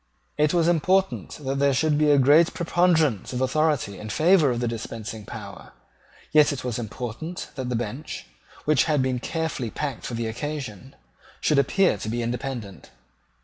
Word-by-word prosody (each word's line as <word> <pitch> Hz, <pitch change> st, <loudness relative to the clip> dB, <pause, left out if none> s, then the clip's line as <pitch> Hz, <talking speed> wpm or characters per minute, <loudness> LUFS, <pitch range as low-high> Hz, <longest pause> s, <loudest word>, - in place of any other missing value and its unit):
It 150 Hz, 0 st, +2 dB
was 170 Hz, -2 st, +2 dB
important 185 Hz, +3 st, +1 dB
that 135 Hz, +1 st, -1 dB
there 140 Hz, -1 st, +3 dB
should 150 Hz, +3 st, +2 dB
be 150 Hz, -1 st, +4 dB
a 145 Hz, -, +6 dB
great 145 Hz, +5 st, +5 dB
preponderance 165 Hz, -, +2 dB
of 125 Hz, -, -2 dB
authority 135 Hz, -6 st, 0 dB
in 105 Hz, -, -7 dB
favour 160 Hz, -, +4 dB
of 120 Hz, -1 st, -1 dB
the 120 Hz, -, -1 dB
dispensing 110 Hz, -2 st, -6 dB
power; 105 Hz, -4 st, -9 dB, 0.6 s
yet 150 Hz, 0 st, +5 dB
it 140 Hz, -, -5 dB
was 125 Hz, -2 st, -2 dB
important 120 Hz, -, -6 dB
that 130 Hz, -2 st, -4 dB
the 125 Hz, -, -1 dB
bench, 120 Hz, +6 st, -5 dB, 0.4 s
which 150 Hz, -3 st, +3 dB
had 150 Hz, -4 st, +2 dB
been 130 Hz, -1 st, 0 dB
carefully 160 Hz, -4 st, -3 dB
packed 140 Hz, 0 st, -4 dB
for 120 Hz, -, -4 dB
the 115 Hz, 0 st, -2 dB
occasion, 130 Hz, -1 st, -5 dB, 0.4 s
should 150 Hz, -, +3 dB
appear 185 Hz, +8 st, +2 dB
to 110 Hz, -, -4 dB
be 120 Hz, +1 st, -2 dB
independent. 120 Hz, -4 st, -5 dB
135 Hz, 170 wpm, -25 LUFS, 120-155 Hz, 0.6 s, a